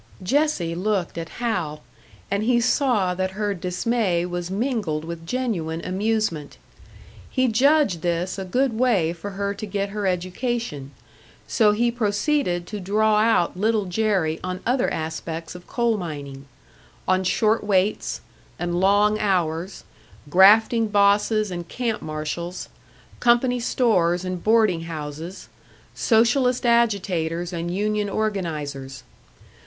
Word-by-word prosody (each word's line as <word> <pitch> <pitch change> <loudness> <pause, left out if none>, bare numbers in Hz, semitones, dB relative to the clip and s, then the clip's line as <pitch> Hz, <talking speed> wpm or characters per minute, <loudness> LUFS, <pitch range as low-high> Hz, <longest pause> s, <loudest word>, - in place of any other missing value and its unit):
Jessie 265 - +1
looked 190 +1 -1
at 165 0 -6
Hal, 180 -11 -2 0.5
and 200 +1 +1
he 240 +2 +3
saw 235 -6 +2
that 185 +1 -2
her 210 -1 0
dismay 180 0 0
was 175 0 -4
mingled 200 - -2
with 165 0 -7
genuine 180 -9 -2
amusement. 190 -5 -1 0.7
He 260 -1 +1
judged 255 - +3
this 175 +3 -1
a - - -3
good 245 +3 0
way 200 -10 +2
for 175 +4 -7
her 200 0 -1
to 215 - -6
get 200 0 -2
her 205 -1 -2
education, 185 - -2 0.6
so 215 -2 +4
he 235 +3 +1
proceeded 210 - 0
to 210 +3 -6
draw 210 +3 +2
out 215 -6 +2
Little 215 +2 +1
Jerry 185 -4 0
on 185 0 -4
other 250 +1 +1
aspects 160 +1 -4
of 180 0 -12
coal 235 -2 +1
mining: 140 -6 -7 0.6
on 185 0 +2
short 215 +4 +2
weights 200 0 0 0.4
and 175 0 -2
long 205 +3 +3
hours, 180 -3 -1 0.5
grafting 220 +5 +6
bosses 205 +1 +2
and 175 -1 -5
camp 235 +2 -2
marshals, 155 +3 -5 0.5
company 245 +1 +3
stores 185 -8 +1
and 185 -1 -4
boarding 215 -6 +3
houses, 160 +3 -7 0.5
Socialist 245 +2 +2
agitators 185 -7 +1
and 170 0 -3
union 210 +2 -1
organisers. 155 -11 -3
195 Hz, 125 wpm, -23 LUFS, 170-225 Hz, 0.7 s, grafting